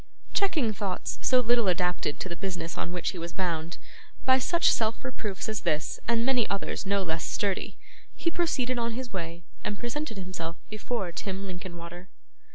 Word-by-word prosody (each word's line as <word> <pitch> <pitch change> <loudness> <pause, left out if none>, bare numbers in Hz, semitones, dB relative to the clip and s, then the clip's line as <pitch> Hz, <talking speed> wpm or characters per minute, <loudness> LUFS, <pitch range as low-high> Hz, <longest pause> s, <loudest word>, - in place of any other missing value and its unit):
Checking 310 - +3
thoughts 195 -3 -2
so 255 -1 +5
little 240 -2 +4
adapted 180 -4 +2
to - - -2
the 170 - -4
business 175 -3 -3
on 175 - -2
which 180 -1 0
he 185 - -6
was 170 0 -4
bound, 170 -3 -1 0.5
by 260 0 +7
such 340 +6 +5
self 225 +3 +1
reproofs 215 -6 -3
as 215 -1 -1
this 150 0 0
and 230 0 +3
many 250 -3 +3
others 200 0 -1
no 200 0 +3
less 160 -2 -1
sturdy, 200 -2 0 0.4
he 335 - +1
proceeded 255 -8 +1
on 230 -1 0
his 245 -1 -4
way 170 -2 -4 0.2
and 205 - -1
presented 240 -1 -2
himself 175 -3 -4 0.2
before 215 -3 -2
Tim 195 +2 -3
Linkinwater. 175 -1 -7
195 Hz, 170 wpm, -29 LUFS, 175-240 Hz, 0.5 s, by